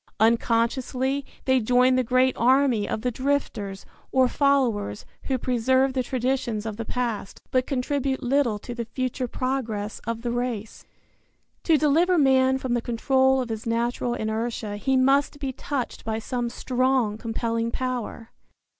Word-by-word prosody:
Unconsciously 240 +4 +1 0.2
they 260 -1 +4
join 250 +2 +4
the 255 0 +2
great 255 +2 +2
army 255 -3 +3
of 215 - -2
the 250 - 0
drifters, 235 -7 -2 0.3
or 260 -1 +4
followers, 245 - +1 0.2
who 265 - 0
preserve 260 +2 +2
the 260 - +1
traditions 250 -3 -1
of 220 -2 -4
the 230 - -3
past, 230 -5 -3
but 255 -1 +1
contribute 270 0 -1
little 250 -4 +2
to 240 +4 -7
the 235 -1 -4
future 255 +2 -3
progress 230 -5 -3
of 230 0 -3
the 240 - -1
race. 240 -3 -4 0.8
To 325 -2 +5
deliver 325 +5 +3
man 265 -2 +4
from 260 -2 -2
the 240 - +1
control 265 +3 +2
of 245 - -5
his 225 0 -5
natural 240 +1 0
inertia 220 -1 -3
he 265 +5 +1
must 275 +3 +3
be 270 -2 -3
touched 265 -1 -4
by 220 0 -2
some 240 +1 -3
strong 255 -3 0
compelling 230 0 -2
power. 245 -2 -4
250 Hz, 150 wpm, -25 LUFS, 230-265 Hz, 0.8 s, To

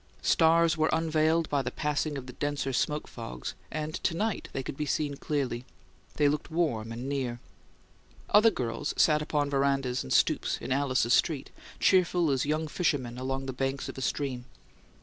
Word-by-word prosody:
Stars 165 0 +4
were 155 0 +2
unveiled 160 0 +2
by 140 -1 +2
the 125 - -3
passing 150 +2 -1
of 130 - -6
the 125 - -9
denser 145 -1 -2
smoke 150 +4 0
fogs, 60 +1 -6 0.2
and 155 +1 -4
to 165 - 0
night 215 +1 -2
they 135 - -3
could - - -5
be 150 +1 -3
seen 145 -1 -1
clearly; 135 -5 -2 0.5
they 145 - +3
looked 150 +1 -1
warm 135 -10 -1
and 120 +3 -5
near. 130 -4 -2 0.9
Other 215 +2 +7
girls 115 - -3
sat 150 -1 +4
upon 145 -2 -1
verandas 135 -2 +1
and - - -7
stoops - - +2
in - - -6
Alice's 130 -3 +2
street, 145 0 +1 0.3
cheerful 180 -4 +3
as 135 0 0
young 155 +1 0
fishermen 135 -7 -1
along 135 +1 -3
the 130 - -4
banks 135 +2 -2
of - - -7
a - - -6
stream. 130 -2 -2
145 Hz, 175 wpm, -29 LUFS, 130-155 Hz, 0.9 s, Other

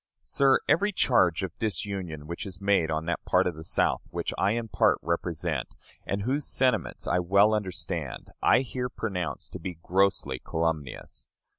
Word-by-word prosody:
Sir, 135 - +3
every 200 +8 +3
charge 95 - +3
of 90 -2 -4
disunion 95 -6 -3
which 85 +6 -5
is 90 -2 -7
made 100 -5 +2
on 80 0 -1
that 85 - -2
part 90 +1 +3
of 90 - 0
the 80 +1 -9
South - - +1
which - - -3
I 100 +2 +2
in 115 -1 -2
part - - +3
represent, 85 -4 -2 0.3
and 100 0 -1
whose 135 +5 -1
sentiments 125 -4 0
I 90 - +2
well 100 +4 +4
understand, 90 -8 -3
I - - +5
here 125 -1 -3
pronounce 90 -9 -3
to - - -8
be 90 - -5
grossly 95 -8 +1
calumnious. 80 -5 -3
90 Hz, 165 wpm, -27 LUFS, 80-105 Hz, 0.3 s, I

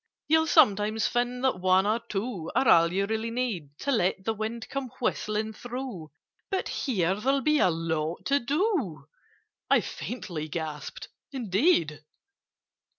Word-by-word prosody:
"You'll 320 +1 +4
sometimes 215 - +4
find 245 +1 -1
that 260 -8 +1
one 185 +1 +4
or 215 +3 +2
two 200 -6 -4
Are 265 - +3
all 170 -4 +6
you 195 +2 +1
really 220 +2 -2
need 210 - -3
To 280 - 0
let 190 -5 +1
the 225 - +1
wind 220 +2 -4
come 275 -2 -4
whistling 215 -2 -1
through— 245 -9 -6 0.4
But 385 - -1
here 190 - 0
there'll 270 +7 +1
be 305 +1 +3
a - - +5
lot 160 -1 -2
to 280 +1 +3
do!" 275 - -1 0.6
I - - +5
faintly 170 -10 -5
gasped 155 -2 -5 0.2
"Indeed! 200 - +1
220 Hz, 145 wpm, -27 LUFS, 175-255 Hz, 0.6 s, all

